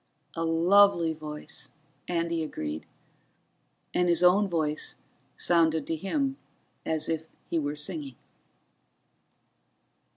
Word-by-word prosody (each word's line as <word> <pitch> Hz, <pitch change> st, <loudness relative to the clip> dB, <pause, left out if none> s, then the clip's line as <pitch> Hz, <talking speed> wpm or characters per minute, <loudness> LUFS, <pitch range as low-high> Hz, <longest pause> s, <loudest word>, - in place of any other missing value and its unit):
"A 165 Hz, -, -1 dB
lovely 170 Hz, +1 st, +4 dB
voice," 150 Hz, -1 st, -6 dB, 0.3 s
Andy 170 Hz, -1 st, 0 dB
agreed, 80 Hz, -, -5 dB, 1.1 s
and 180 Hz, 0 st, +2 dB
his 170 Hz, +1 st, +3 dB
own 195 Hz, +3 st, +5 dB
voice 155 Hz, -4 st, -1 dB, 0.4 s
sounded 160 Hz, -3 st, +3 dB
to 165 Hz, -, -1 dB
him 270 Hz, -, -1 dB, 0.5 s
as 160 Hz, -1 st, 0 dB
if 160 Hz, -1 st, -2 dB, 0.2 s
he 165 Hz, -, -1 dB
were 145 Hz, -1 st, -2 dB
singing. 150 Hz, -4 st, -3 dB
165 Hz, 100 wpm, -28 LUFS, 155-175 Hz, 1.1 s, own